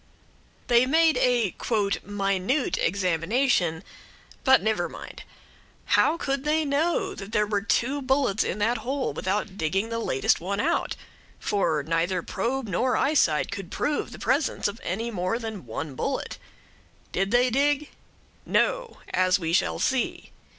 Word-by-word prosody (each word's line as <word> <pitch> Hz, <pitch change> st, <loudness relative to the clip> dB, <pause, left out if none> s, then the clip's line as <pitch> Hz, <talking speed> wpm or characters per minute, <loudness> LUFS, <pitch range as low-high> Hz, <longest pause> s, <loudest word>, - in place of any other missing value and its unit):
They 240 Hz, +1 st, +4 dB
made 320 Hz, +3 st, +4 dB
a 240 Hz, -7 st, +2 dB, 0.5 s
"minute" 200 Hz, +6 st, 0 dB
examination; 180 Hz, -, +1 dB, 0.6 s
but 265 Hz, 0 st, +6 dB
never 205 Hz, -6 st, 0 dB
mind, -, -, -9 dB, 0.7 s
how 330 Hz, -, +4 dB
could 275 Hz, -4 st, -2 dB
they 310 Hz, +1 st, +1 dB
know 300 Hz, +5 st, 0 dB
that 200 Hz, +2 st, -9 dB
there 210 Hz, -, +3 dB
were 205 Hz, -1 st, -1 dB
two 260 Hz, +6 st, 0 dB
bullets 260 Hz, -5 st, +1 dB
in -, -, -3 dB
that 225 Hz, +3 st, +1 dB
hole 265 Hz, +3 st, -2 dB
without 200 Hz, +1 st, -2 dB
digging 195 Hz, +8 st, 0 dB
the 230 Hz, 0 st, -2 dB
latest 135 Hz, -12 st, +1 dB
one 200 Hz, +3 st, -2 dB
out? 330 Hz, +8 st, 0 dB, 0.4 s
for 165 Hz, -7 st, 0 dB
neither 165 Hz, +3 st, 0 dB
probe 245 Hz, +5 st, -2 dB
nor 245 Hz, +7 st, +1 dB
eyesight 265 Hz, -, +2 dB
could 195 Hz, -3 st, -6 dB
prove 295 Hz, 0 st, -2 dB
the -, -, -9 dB
presence 275 Hz, -3 st, 0 dB
of 205 Hz, +2 st, -6 dB
any 225 Hz, +6 st, -2 dB
more 185 Hz, +2 st, -1 dB
than 220 Hz, -, -7 dB
one 140 Hz, +6 st, -5 dB
bullet. 265 Hz, -, -3 dB, 0.7 s
Did 195 Hz, +1 st, 0 dB
they 245 Hz, +3 st, +3 dB
dig? 290 Hz, +3 st, +1 dB, 0.5 s
No; -, -, 0 dB, 0.2 s
as 185 Hz, 0 st, +3 dB
we 165 Hz, -3 st, -3 dB
shall -, -, +2 dB
see. 260 Hz, -2 st, -1 dB
220 Hz, 145 wpm, -26 LUFS, 185-265 Hz, 0.7 s, but